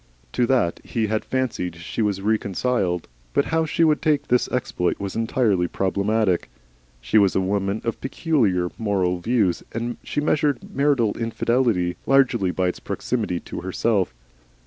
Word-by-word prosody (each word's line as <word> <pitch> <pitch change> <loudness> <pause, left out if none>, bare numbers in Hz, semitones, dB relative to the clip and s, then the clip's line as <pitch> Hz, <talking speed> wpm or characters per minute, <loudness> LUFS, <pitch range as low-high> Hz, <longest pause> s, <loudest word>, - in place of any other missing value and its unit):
To 120 -1 +1
that 120 -10 +1
he 115 -2 -1
had 110 0 -1
fancied 120 -10 -2
she 85 +6 -4
was 100 -3 0
reconciled, 100 -3 0 0.3
but - - +3
how 160 0 +1
she 165 - +1
would 155 -2 +3
take 155 -3 +1
this 125 0 +3
exploit 105 -8 -1
was 100 -1 -4
entirely 110 -5 +1
problematical. 100 +1 0 0.5
She - - +3
was 100 -2 +3
a - - +4
woman 100 +2 -1
of 115 - -3
peculiar 115 - +1
moral 95 -5 0
views, 105 -2 +1
and 120 +1 -3
she - - -2
measured 145 -3 0
marital 140 -6 +2
infidelity 115 -5 +1
largely 135 -8 +3
by 90 +1 0
its - - -5
proximity 110 -8 -2
to - - -7
herself. 95 +1 0
110 Hz, 150 wpm, -23 LUFS, 95-125 Hz, 0.5 s, a